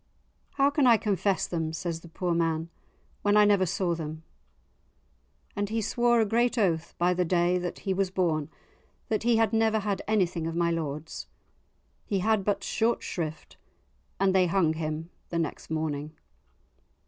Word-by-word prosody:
"How 280 0 +3
can 285 -2 +3
I 235 -2 +7
confess 200 -2 0
them," 160 -2 -3
says 165 0 -3
the 170 - -13
poor 175 +1 -2
man, 165 0 0 0.5
"when 205 0 +3
I 210 - +7
never 200 -3 +3
saw 175 +1 0
them." 160 -1 -6 1.3
And 205 -1 -1
he 225 +1 -1
swore 240 +2 +2
a 220 - +4
great 235 +3 +1
oath, 170 -6 0
by 175 +1 +3
the 180 0 +1
day 175 +1 +2
that 175 0 -5
he 195 - +1
was 190 0 0
born, 165 -6 0 0.6
that 215 -2 0
he 235 +1 +3
had 225 -1 +2
never 220 -1 +3
had 205 -2 -1
anything 180 -6 +1
of 165 - -4
my 170 0 +2
lord's. 155 -1 -4 0.8
He 200 - -1
had 210 +1 +2
but 200 0 0
short 230 +3 0
shrift 160 -3 -5 0.6
and 195 -1 +3
they 185 -1 +4
hung 170 -3 +2
him 160 +1 -4 0.2
the 170 - -2
next 165 -3 -3
morning. 155 -1 -3
180 Hz, 170 wpm, -28 LUFS, 165-210 Hz, 1.3 s, I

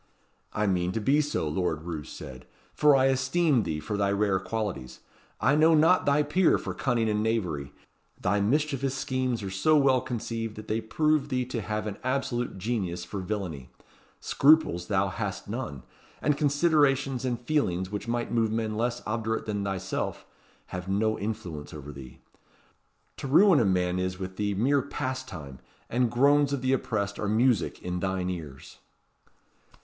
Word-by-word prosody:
"I 105 - 0
mean 90 -2 +1
to 115 - -1
be 140 +8 +3
so," 145 - -2
Lord 80 0 -1
Roos 80 -4 -6
said; 65 -1 -10 0.3
"for 150 -1 +5
I 135 -1 +4
esteem 135 +1 +2
thee 80 -6 -3
for 105 +7 -3
thy 100 -1 +1
rare 100 -1 +1
qualities. 95 - -4 0.4
I 145 - +3
know 160 +2 +5
not 165 +3 +4
thy 145 +1 +4
peer 165 +5 +3
for - - -5
cunning 120 -4 0
and 105 -1 +1
knavery. 90 -11 -1 0.5
Thy 100 +2 +1
mischievous 135 +3 0
schemes 130 -4 -1
are 95 - -4
so 125 +12 +3
well 135 -3 +4
conceived 115 -3 -4
that 110 0 -9
they 110 +1 -1
prove 150 +6 +1
thee 125 -1 0
to 120 -2 -4
have 105 +2 -3
an 105 -2 -4
absolute 125 -3 -1
genius 95 -5 -2
for 100 - -5
villany. 90 -9 -4 0.5
Scruples 140 - +3
thou 100 -1 +1
hast 95 0 -4
none; 100 - -5 0.4
and 150 - +1
considerations 145 -3 +2
and 125 -3 -1
feelings 100 - -1
which 105 +2 -4
might 120 0 -2
move 115 -2 +1
men 110 -1 -1
less 120 +2 -1
obdurate 110 0 -2
than 105 -2 -2
thyself, 95 -1 -3 0.5
have 90 +1 -5
no 110 +3 +1
influence 95 -9 -5
over 75 -1 -8
thee. 65 -2 -11 1.0
To - - -5
ruin 175 +4 +6
a 115 - +3
man 90 -1 +1
is 90 0 -2
with 95 0 -6
thee 105 -1 -1
mere 135 +7 +2
pastime; 130 - -5 0.3
and 120 0 +2
groans 140 +4 +4
of 140 -2 -2
the 130 +1 +2
oppressed 100 -5 -2
are 105 - -1
music 115 +1 +1
in 90 0 -3
thine 95 0 -1
ears." 75 -7 -9
110 Hz, 165 wpm, -27 LUFS, 95-130 Hz, 1.0 s, ruin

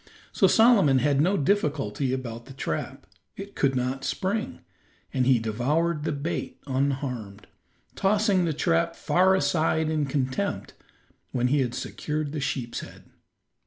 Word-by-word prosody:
So - - +4
Solomon 220 - +5
had 140 +1 +2
no 190 +5 +2
difficulty 140 - 0
about 120 -3 -5
the 135 - -11
trap; 80 - -4 0.3
it 200 +1 -8
could 135 -2 +1
not 130 +2 -2
spring, 200 +9 -2 0.5
and 130 -1 +1
he 130 -2 +5
devoured 150 +9 0
the - - 0
bait 150 +4 -4
unharmed, 130 -6 -2 0.5
tossing 200 -2 +2
the 165 - 0
trap 165 +2 +1
far 190 +2 +3
aside 160 -3 +1
in 150 -2 0
contempt 135 +8 -2 0.6
when 125 0 +1
he 145 +2 +2
had 125 -2 -1
secured 150 -1 -3
the 150 -1 -4
sheep's 125 -4 -3
head. - - -12
145 Hz, 140 wpm, -26 LUFS, 130-170 Hz, 0.6 s, Solomon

